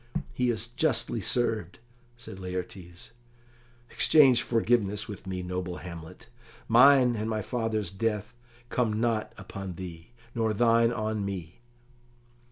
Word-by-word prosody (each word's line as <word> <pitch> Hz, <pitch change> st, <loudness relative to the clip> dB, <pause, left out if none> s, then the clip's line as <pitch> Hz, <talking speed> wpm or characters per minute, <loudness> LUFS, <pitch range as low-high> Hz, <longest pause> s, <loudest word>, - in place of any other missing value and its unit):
"He 125 Hz, 0 st, +1 dB
is 110 Hz, -1 st, -1 dB
justly 120 Hz, -2 st, 0 dB
served," 110 Hz, -4 st, 0 dB, 0.4 s
said 115 Hz, -5 st, -9 dB
Laertes. 90 Hz, -1 st, -7 dB, 0.8 s
"Exchange 135 Hz, -6 st, +5 dB
forgiveness 110 Hz, -3 st, +1 dB
with 100 Hz, -2 st, -9 dB
me, 90 Hz, -1 st, -4 dB
noble 90 Hz, 0 st, -4 dB
Hamlet. 85 Hz, -3 st, -10 dB, 0.4 s
Mine 125 Hz, +1 st, +6 dB
and 110 Hz, +1 st, -3 dB
my 110 Hz, -1 st, -2 dB
father's 115 Hz, -4 st, -2 dB
death 105 Hz, +1 st, -2 dB, 0.4 s
come 110 Hz, -3 st, 0 dB
not 115 Hz, -2 st, 0 dB
upon 95 Hz, -1 st, -7 dB
thee, 85 Hz, -1 st, -9 dB, 0.2 s
nor 110 Hz, -2 st, 0 dB
thine 115 Hz, +1 st, +4 dB
on 110 Hz, -2 st, -2 dB
me." 95 Hz, -3 st, -6 dB
110 Hz, 120 wpm, -28 LUFS, 95-115 Hz, 0.8 s, Mine